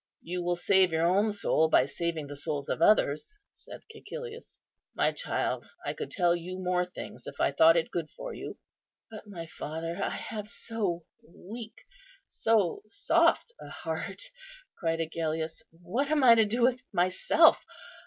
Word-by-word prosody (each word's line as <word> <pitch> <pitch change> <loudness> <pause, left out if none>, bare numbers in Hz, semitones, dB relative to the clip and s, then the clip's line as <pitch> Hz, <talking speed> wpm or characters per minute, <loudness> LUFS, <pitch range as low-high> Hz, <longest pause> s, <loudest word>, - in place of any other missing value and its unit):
"You 180 +1 -3
will 175 0 0
save 185 +1 +3
your 160 +1 +1
own 200 +5 +3
soul 160 -6 +2
by 130 - +5
saving 165 +1 -3
the 145 0 -8
souls 145 -1 -3
of - - -2
others," 210 - +3 0.2
said - - -12
Cæcilius; 470 +1 -9 0.4
"my - - +2
child, - - -2 0.2
I - - -1
could 455 -2 -6
tell 175 -2 +2
you 180 +2 -6
more 180 -1 0
things 180 - -9
if - - -9
I - - +3
thought 160 +4 +6
it 165 - 0
good 165 -3 -3
for - - -6
you." - - -7 0.5
"But, 215 -1 -10
my 175 -5 -7
father, 165 +2 -5
I - - 0
have 210 -1 -6
so 200 -5 -3 0.2
weak, 220 +6 -10 0.4
so 220 - +1
soft 405 +3 +2
a - - -9
heart," - - -5 0.5
cried 165 -1 -1
Agellius; 160 0 -3
"what 185 - -3
am 305 -2 +2
I 240 -2 +9
to 225 -1 +5
do 235 +4 0
with 250 0 +3
myself? 185 - +4
180 Hz, 165 wpm, -29 LUFS, 165-225 Hz, 0.5 s, I